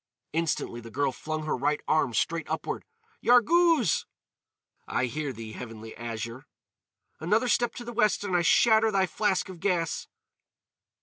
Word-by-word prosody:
Instantly 160 -7 -1
the 115 - -10
girl 140 +3 0
flung 155 +4 -4
her 155 - 0
right 145 +3 0
arm 155 -5 +2
straight 165 -1 -1
upward. - - -3 0.4
"Yarghouz!" 295 - +4 0.8
"I 130 - 0
hear 145 +3 -3
thee, 115 -2 -8
Heavenly 110 -1 -9
Azure." 115 +1 -6 0.7
"Another 215 +10 +1
step 240 0 +1
to 240 - -7
the 240 - -6
west 215 -3 +2
and 190 -3 -1
I 175 - +4
shatter 220 +5 +5
thy 195 -2 +2
flask 190 +2 0
of 185 -3 -10
gas." 170 -4 -1
165 Hz, 145 wpm, -28 LUFS, 130-215 Hz, 0.8 s, shatter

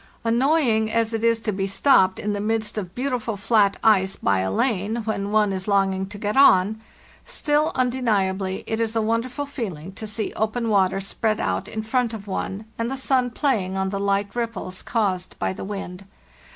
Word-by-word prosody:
"Annoying 235 -2 +2
as 230 0 +1
it 225 0 -2
is 230 -1 +3
to 215 - -1
be 195 -1 -2
stopped 190 -3 +4
in 210 0 -2
the 205 - -2
midst 220 0 -1
of 190 -3 -5
beautiful 245 -4 -2
flat 205 -1 +3
ice 195 -4 +4
bya 95 -1 +1
lane, 220 - 0
when 200 -2 -2
one 210 -2 +3
is 190 +1 -4
longing 195 -1 +1
to 205 - -9
get 210 0 -2
on, 215 -5 +5 0.4
still, 295 0 0
undeniably, 200 -7 0
it 220 - -2
is 225 0 -1
a 225 - +2
wonderful 235 +5 -1
feeling 190 - -6
to 215 +3 -7
see 215 0 -3
open 225 +2 -1
water 195 -2 +2
spread 215 +2 -1
out - - -1
in 220 0 -4
front 235 0 0
of 205 -2 -9
one, 195 +2 -4
and 230 +1 -1
the 270 - -3
sun 260 -1 +1
playing 220 -8 0
on 190 0 0
the 200 0 -3
light 200 +1 0
ripples 225 -6 -4
caused 190 -5 -1
by - - -1
the - - -7
wind. 195 -2 -6
215 Hz, 190 wpm, -23 LUFS, 195-230 Hz, 0.4 s, on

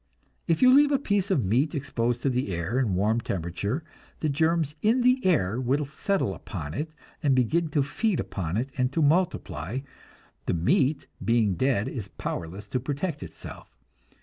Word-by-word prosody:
If 165 +7 +2
you 255 0 +8
leave 290 +1 +6
a 280 - +4
piece 205 -7 0
of 145 - +2
meat 130 - +1
exposed 120 -4 -1
to 140 - +3
the 125 -5 -1
air 85 +10 -1
in 110 -8 +1
warm 110 +5 +2
temperature, 100 - -3 0.4
the 155 - 0
germs 160 +1 +1
in 230 +4 +3
the 250 +1 +3
air 125 - +2
will 135 +4 +1
settle 155 - -1
upon 80 -3 -6
it 150 - -3 0.3
and 140 -5 +3
begin 155 +7 +2
to 145 -2 +2
feed 200 - 0
upon 95 -2 -3
it 130 +4 -2
and 125 -1 +1
to 160 - +2
multiply; 140 - 0 0.7
the - - +1
meat, 130 - +2 0.2
being 115 -4 +3
dead, 120 0 +1
is 110 -7 -5
powerless 90 +1 -5
to 130 - 0
protect 145 +4 -3
itself. - - -10
135 Hz, 175 wpm, -27 LUFS, 105-160 Hz, 0.7 s, you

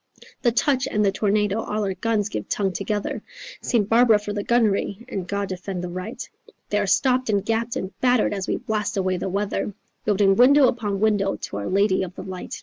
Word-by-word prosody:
The 240 - +3
touch 260 +2 +1
and 210 0 +1
the 195 - +3
tornado; 210 +1 +1
all 210 0 -2
our 195 -1 -1
guns 215 0 0
give - - -5
tongue 195 -2 0
together 205 +1 -3 0.4
St. 225 -5 +1
Barbara 230 0 +5
for 210 0 -5
the 205 - -2
gunnery 220 -1 +1
and 190 -8 -5
God 200 +1 -2
defend 185 0 -5
the 180 - -4
right, 185 +8 -6 0.4
They 210 - +2
are 205 - 0
stopped 255 +4 +2
and 200 -2 +1
gapped 230 +1 -1
and 190 - -3
battered 250 -4 +3
as 195 -2 -3
we - - 0
blast 215 -4 -2
away 185 -1 0
the 185 - -3
weather. 200 +1 -2 0.3
Building 200 -2 +3
window 265 +4 +6
upon 205 -5 -2
window 205 -3 +2
to - - -6
our 100 - -4
lady 195 0 +2
of 185 -1 -5
the - - -7
light. 185 -1 -7
205 Hz, 210 wpm, -23 LUFS, 195-225 Hz, 0.4 s, window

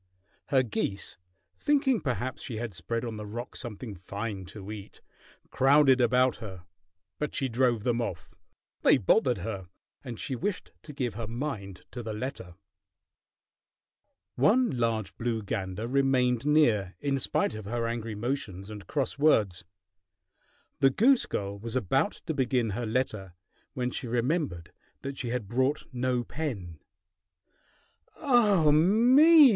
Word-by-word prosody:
Her 130 -2 +3
geese, 100 -5 -3 0.4
thinking 275 -5 +2
perhaps 130 -2 -2
she 115 - -5
had 115 -2 -4
spread 115 +5 -3
on 115 -2 -5
the 105 - -6
rock 120 +4 -6
something 115 -1 -6
fine 100 +2 -5
to 100 +2 -9
eat, 105 -2 -9 0.5
crowded 135 -1 +5
about 125 +1 +3
her, 95 -5 -9 0.5
but 150 - -3
she 135 - +1
drove 120 -2 +1
them 120 0 +1
off. 95 -7 -5 0.5
They - - +6
bothered 125 - +3
her, 100 -1 -5 0.4
and 120 -5 -7
she 135 - -2
wished 195 - -3
to 150 - -10
give 125 -5 -2
her 110 +1 -5
mind 115 -6 -5
to 125 - -6
the 110 -2 -5
letter. 105 -6 -6 1.8
One 225 - +3
large 115 -5 -1
blue 115 -2 -1
gander 100 +1 -3
remained 130 -1 +2
near, 115 -11 +3
in 140 -1 0
spite - - 0
of 110 -1 -7
her 115 +3 -2
angry 115 -1 -3
motions 105 -4 -4
and 105 -2 -9
cross 140 -1 -2
words. 105 - +3 1.2
The 135 - +6
goose 240 - +4
girl 100 0 -3
was 115 +3 -6
about 130 - +1
to 160 - -1
begin 125 -5 +1
her 115 +3 -3
letter 110 -6 -2 0.4
when 125 -1 -1
she 125 - -5
remembered 120 - -1 0.3
that 135 0 -5
she 120 - -2
had 120 -4 -2
brought 130 +6 0
no 125 0 0
pen. 105 - -5 1.4
"Ah 210 - +4
me! 255 - +7
120 Hz, 140 wpm, -28 LUFS, 105-140 Hz, 1.8 s, me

